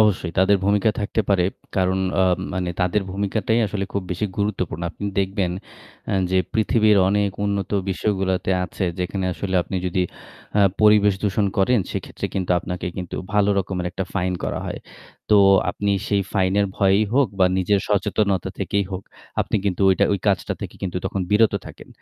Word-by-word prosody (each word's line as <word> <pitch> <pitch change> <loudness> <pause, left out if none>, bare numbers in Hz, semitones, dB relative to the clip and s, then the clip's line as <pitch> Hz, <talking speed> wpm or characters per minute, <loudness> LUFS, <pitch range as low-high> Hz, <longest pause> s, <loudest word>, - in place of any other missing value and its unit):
অবশ্যই 95 -5 +2
তাদের 95 +2 +5
ভূমিকা 105 +2 +3
থাকতে 105 +2 0
পারে। 95 -3 +3 0.3
কারণ 95 0 +2 0.2
আ - - +5 0.3
মানে 90 -1 -1
তাদের 90 +3 +1
ভূমিকাটাই 100 +3 0
আসলে 100 0 -3
খুব 100 - -1
বেশি 90 +4 -1
গুরুত্বপূর্ণ। 95 -5 -2
আপনি 100 - -8
দেখবেন 95 -1 0 0.6
এ্যা - - +1
যে 95 - +3 0.2
পৃথিবীর 110 -1 +3
অনেক 100 0 +1
উন্নত 100 -2 -1 0.2
বিশ্বগুলোতে 95 -1 -1
আছে 95 - -4
যেখানে 95 +1 -2
আসলে 95 +1 -4
আপনি 95 +2 -5
যদি 90 +1 0 0.6
আ - - +5 0.2
পরিবেশ 105 -2 +5
দূষণ 105 0 +1
করেন 115 +5 +4
সেক্ষেত্রে - - -4
কিন্তু 95 -2 -2
আপনাকে 90 0 -5
কিন্তু 90 -2 -5 0.2
ভালো 105 -1 +3
রকমের 90 -2 -2
একটা 95 +1 -3
ফাইন 90 -1 0
করা - - -2
হয়। - - -5 0.5
তো 105 - +7 0.3
আপনি 100 +3 -2 0.2
সেই 100 -1 +2
ফাইনের 100 +1 +2
ভয়েই 100 +2 +3
হোক 135 -3 +4
বা 95 - +5
নিজের 100 +2 +2
সচেতনতা 100 -1 +1
থেকেই 100 0 0
হোক, 95 0 -4 0.4
আপনি - - 0
কিন্তু 100 -1 0
ওইটা 95 - +3
ওই 100 - 0
কাজটা 100 -2 +1
থেকে - - -6
কিন্তু 90 -2 -3
তখন 95 0 -2
বিরত 105 +1 +4
থাকেন। - - -12
100 Hz, 170 wpm, -22 LUFS, 95-105 Hz, 0.6 s, তো